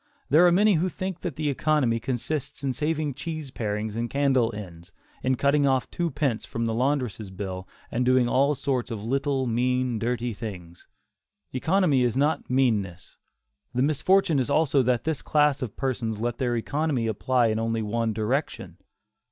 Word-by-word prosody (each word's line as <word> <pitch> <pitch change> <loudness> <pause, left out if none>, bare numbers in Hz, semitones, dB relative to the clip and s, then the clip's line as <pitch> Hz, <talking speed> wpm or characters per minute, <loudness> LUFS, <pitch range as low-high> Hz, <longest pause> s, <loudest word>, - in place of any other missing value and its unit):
There 165 +5 +7
are - - +5
many 205 +4 +4
who 185 - +1
think 185 0 -5
that 170 -6 -5
economy 145 -5 +1
consists 130 +5 -4
in 135 -2 0
saving 150 +1 -1
cheese 155 0 -6
parings 105 -2 -3
and 115 +1 -2
candle 135 -4 +2
ends, 85 -5 -9 0.3
in 130 0 +1
cutting 140 +2 +2
off 130 -1 +1
two 170 -1 -1
pence 140 -6 -1
from 115 0 -3
the 115 - -1
laundress' 125 -4 -1
bill 95 -1 -6 0.2
and 120 +2 0
doing 125 -1 +3
all 140 +4 +3
sorts 130 -2 -1
of 110 -3 -5
little, 135 +2 0
mean, 125 0 0
dirty 120 0 -1
things. 90 -6 -8 0.7
Economy 160 0 +2
is 120 0 0
not 150 +3 +1
meanness. 110 -9 0 0.6
The 125 - +2
misfortune 155 +2 +3
is 130 - -1
also 140 -2 +3
that 125 -1 +1
this 160 -3 -2
class 150 -2 +2
of 120 -5 -5
persons 120 -5 -2
let 120 +1 -2
their 120 -3 0
economy 140 +1 -1
apply 120 +2 +1
in 110 0 0
only 115 0 -1
one 115 +1 -1
direction. 115 +7 -2
130 Hz, 170 wpm, -26 LUFS, 115-145 Hz, 0.7 s, There